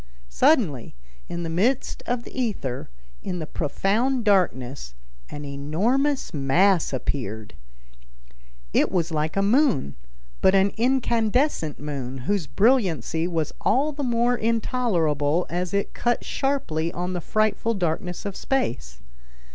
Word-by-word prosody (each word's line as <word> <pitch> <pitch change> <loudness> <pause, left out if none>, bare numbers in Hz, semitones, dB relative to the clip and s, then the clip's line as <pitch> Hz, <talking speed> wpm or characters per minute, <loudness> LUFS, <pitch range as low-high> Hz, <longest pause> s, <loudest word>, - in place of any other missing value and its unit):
Suddenly, 140 - +2 0.3
in 170 0 -4
the - - -3
midst 225 +10 0
of 245 -1 -1
the - - -12
ether, 200 - -3 0.3
in 180 - -4
the 160 - -4
profound 215 - 0
darkness, 135 - +1 0.3
an 145 0 -7
enormous 205 - 0
mass 165 +6 +3
appeared. 120 - -4 1.2
It - - +3
was 170 -2 0
like 155 +2 -1
a 195 - +3
moon, 230 - +2 0.5
but 190 +1 +5
an 195 +1 +4
incandescent 235 - +1
moon 135 -3 -5
whose 200 -5 0
brilliancy 175 - +2
was 165 -4 -2
all 275 +7 +2
the 290 0 -6
more 240 -1 +2
intolerable 180 - +1
as 175 0 -2
it 200 0 -1
cut 240 0 0
sharply 170 - -1
on 180 +1 -3
the 175 - -3
frightful 215 +4 0
darkness 180 0 -2
of 200 -2 -4
space. 60 - -2
185 Hz, 125 wpm, -24 LUFS, 150-235 Hz, 1.2 s, but